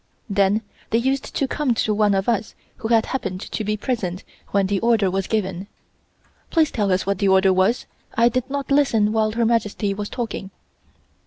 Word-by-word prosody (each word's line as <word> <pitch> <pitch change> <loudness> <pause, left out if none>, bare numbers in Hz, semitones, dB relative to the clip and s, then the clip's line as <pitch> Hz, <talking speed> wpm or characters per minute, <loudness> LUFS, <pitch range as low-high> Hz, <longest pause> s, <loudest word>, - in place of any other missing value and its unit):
Then 200 +2 +2 0.3
they 225 - +2
used 265 +3 -1
to 275 - +1
come 270 -3 0
to 215 -1 +1
one 205 -1 +3
of 195 0 -1
us 225 -3 0 0.2
who 220 - -4
had 225 -1 +3
happened 190 -8 -3
to 215 - -4
be 210 +1 -1
present 205 -6 -3 0.3
when 200 -1 +2
the 195 0 0
order 225 -4 +2
was 190 0 -1
given: 195 -3 -2 0.8
"Please 320 -3 +2
tell 205 -3 0
us 185 - +1
what 200 -1 -1
the 200 - +2
order 190 0 +5
was. 190 +6 +2 0.3
I 235 +1 +5
did 255 +2 -1
not 280 0 -4
listen 225 -7 +3
while 215 -1 +1
Her 230 0 +1
Majesty 215 -3 0
was 205 +1 -5
talking." 230 -5 -4
215 Hz, 190 wpm, -22 LUFS, 195-235 Hz, 0.8 s, order